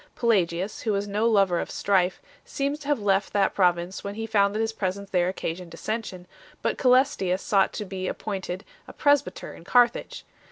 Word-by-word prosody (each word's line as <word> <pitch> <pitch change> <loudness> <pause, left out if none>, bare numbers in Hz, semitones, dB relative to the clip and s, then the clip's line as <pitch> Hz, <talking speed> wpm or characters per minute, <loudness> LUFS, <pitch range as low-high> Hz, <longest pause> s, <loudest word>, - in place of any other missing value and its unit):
Pelagius, 190 -4 0
who 220 - -1
was 200 +1 -1
no 210 +3 +1
lover 195 -6 +3
of - - -4
strife, 190 -2 +1 0.2
seems 280 +2 -2
to 285 - -10
have 290 -4 +1
left 195 -1 +1
that 200 -2 +2
pro 180 -3 +5
vince 175 +2 -7
when 200 0 -5
he 225 +1 -4
found 205 -2 +2
that - - -1
his 225 0 -1
presence 200 -1 -3
there 180 -1 +2
occasioned 180 -1 -5
dissension, 185 +1 -5 0.4
but - - -1
Cselestius 250 -8 +3
sought 195 -2 +3
to 210 - -4
be 185 -1 -5
appointed 190 -2 -4 0.2
a - - -10
pres 285 -2 +4
byter 180 - -9
in - - -13
Carthage. 240 +5 +2
200 Hz, 195 wpm, -25 LUFS, 185-225 Hz, 0.4 s, pro